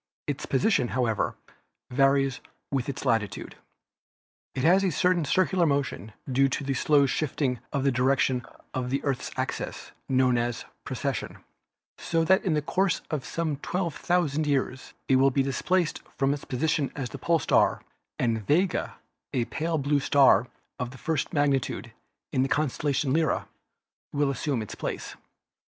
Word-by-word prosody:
Its 145 -2 -3
position, 135 - +2
however, 115 -4 0 0.6
varies 135 0 +3 0.3
with 135 -1 -1
its 140 - -5
latitude. 110 -3 -1 1.0
It 130 - -2
has 185 +5 +5
a 190 - +3
certain 175 0 +2
circular 185 +2 +2
motion, 135 - -1 0.2
due 135 +1 +3
to 135 - -2
the 135 0 -1
slow 140 +2 +4
shifting 135 -3 -1
of 140 -3 -1
the 140 - +3
direction 130 0 +2 0.3
of 125 -1 -2
the 135 +2 -1
Earth's 135 -3 -1
axis, - - -4 0.2
known 130 -2 +3
as 120 0 -2 0.2
precession, - - -3 0.6
so 165 -1 0
that 190 +4 +4
in 175 -5 +1
the 150 - 0
course 190 +3 +1
of 150 -4 -2
some 160 -4 -2
twelve 170 +2 -3
thou 180 0 +4
sand 150 +1 -1
years 130 -2 -1
it 130 - +4
will 135 +1 +5
be 135 +1 +1
displaced 165 +6 0 0.2
from 135 0 +2
its 145 - -6
position 150 +2 0
as 135 -4 -3
pole 170 +6 +1
star - - +2 0.3
and 115 -2 0
Vega, 180 +5 +1 0.4
a 120 -2 +1
pale 160 +5 -2
blue 140 0 +1
star 135 -5 +5 0.3
of 125 -1 -2
the 130 - -11
first 155 +1 -1
magnitude 140 -5 0 0.4
in 130 - +2
the 135 - +1
constellation 140 -1 0
Lyra, 160 -1 +1 0.6
will 145 -1 +1
assume 135 -4 -1
its 105 - -8
place. - - -5
140 Hz, 155 wpm, -27 LUFS, 130-155 Hz, 1.0 s, has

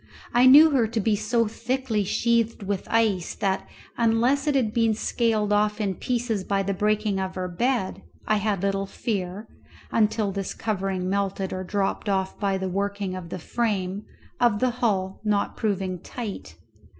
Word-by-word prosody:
I 245 +2 +6
knew 300 +4 +9
her 250 -5 +3
to 225 +1 -2
be 215 0 +2
so 230 +3 +1
thickly 230 0 -1
sheathed 230 +2 +1
with 195 -1 -3
ice 215 -6 +1
that, 190 -1 -1 0.3
unless 240 +5 +2
it 290 - +2
had 230 -6 +1
been 225 -2 +2
scaled 215 -2 0
off 210 +1 +2
in 200 -3 0
places 230 0 -2
by 195 0 0
the 200 +1 -1
breaking 210 0 0
of 190 -1 -3
her 185 -1 -2
bed, 225 +3 -1 0.2
I 215 - +2
had 205 -2 -1
little 195 0 0
fear 195 -1 -3 0.5
(until 215 -2 +2
this 195 0 -4
covering 195 -3 -2
melted 195 0 -1
or 185 0 -3
dropped 200 +2 -1
off 190 -1 -1
by 195 -2 +1
the 190 0 -3
working 200 0 -2
of 185 -2 -7
the 185 - -4
frame) 200 0 -2 0.3
of 235 -4 +3
the 255 +3 +1
hull 200 -6 -1
not 210 -2 0
proving 190 -4 -1
tight. 200 - -7
205 Hz, 170 wpm, -25 LUFS, 195-230 Hz, 0.5 s, knew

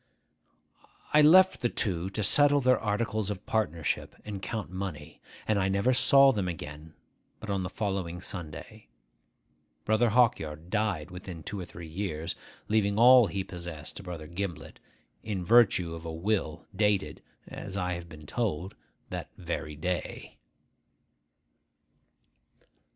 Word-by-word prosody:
I 150 - +7
left 185 +5 +6
the 120 - +1
two 95 -5 -2
to 105 +2 -2
settle 145 +7 +5
their 130 -1 +3
articles 105 -1 -1
of 100 -3 -5
partnership, 85 -8 -1
and 100 -2 -6
count 105 -1 -4
money; 95 -6 -6 0.3
and 110 -2 +2
I 95 0 +1
never 100 +6 +2
saw 135 +1 +6
them 100 -6 -2
again 80 -2 -7 0.4
but 110 - -5
on 100 -1 0
the 90 - -3
following 95 -4 -3
Sunday. 90 +4 -7 1.0
Brother 110 +2 +3
Hawkyard 85 -9 +1
died 105 -8 -1
within 90 -3 -8
two 100 - -5
or 90 - -5
three 85 -1 -10
years, 85 -1 -4 0.3
leaving 105 -1 +1
all 125 0 +8
he 95 +2 -3
possessed 85 -4 -6
to - - -6
Brother 90 -4 -7
Gimblet, 85 +1 -6 0.4
in 100 -5 -4
virtue 100 -6 +4
of 80 0 -8
a 80 - -5
will 85 -2 -2
dated 105 -1 +1 0.3
(as 100 -1 -7
I 90 -1 -1
have 85 -1 -7
been 75 -2 -12
told) 95 -1 -2 0.4
that - - -5
very 75 +1 -4
day. 90 +4 -4
95 Hz, 140 wpm, -29 LUFS, 85-110 Hz, 1.0 s, all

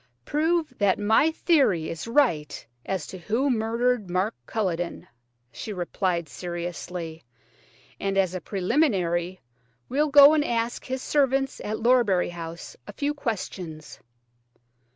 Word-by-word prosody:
"Prove 315 -1 0
that 200 -2 +3
my 220 +9 +3
theory 275 - +2
is 165 +6 -6
right 230 - +1 0.2
as 190 -6 -2
to 185 - -9
who 230 +10 0
murdered 230 -1 0
Mark 185 +5 0
Culledon," 175 -5 -2 0.5
she 220 - -7
replied 175 -2 -2
seriously; 170 +1 -6 0.8
"and 195 0 -1
as 190 -2 +2
a 185 - -4
preliminary 185 - 0 0.5
we'll 295 +4 +1
go 285 +1 +9
and 305 -1 +3
ask 235 -2 -2
his 260 0 -4
servants 270 -2 +1
at 215 +1 -3
Lorbury 230 -8 +3
House 170 0 -8
a - - -8
few 290 +1 -1
questions." 185 - -5
205 Hz, 125 wpm, -25 LUFS, 175-260 Hz, 0.8 s, go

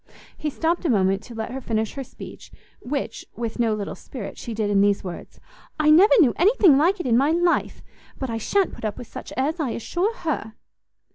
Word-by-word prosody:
He 305 - -3
stopt 330 +5 -1
a 335 - 0
moment 195 -3 +2
to 235 - -11
let 220 +1 -4
her 265 +1 -5
finish 220 -3 -2
her 275 - -5
speech, - - -12 0.3
which, 265 -3 -4
with 230 0 -4
no 225 -2 +2
little 205 -1 -4
spirit, 240 -7 -8
she 230 - -7
did 210 -2 -1
in 200 -1 +4
these 200 0 +2
words, 180 -2 -8 0.4
"I 305 0 +5
never 380 +10 +7
knew 265 - +5
anything 380 - +5
like 350 +8 +3
it 355 - -4
in 235 -2 +3
my 275 +4 +3
life; 345 +1 +1 0.3
but 265 - -3
I 225 - -2
shan't 390 - +1
put - - -11
up 215 -1 -3
with - - -8
such - - -9
airs, 300 +6 0
I 290 -5 0
assure 350 - -1
her!" 310 - -4
260 Hz, 215 wpm, -23 LUFS, 220-325 Hz, 0.4 s, never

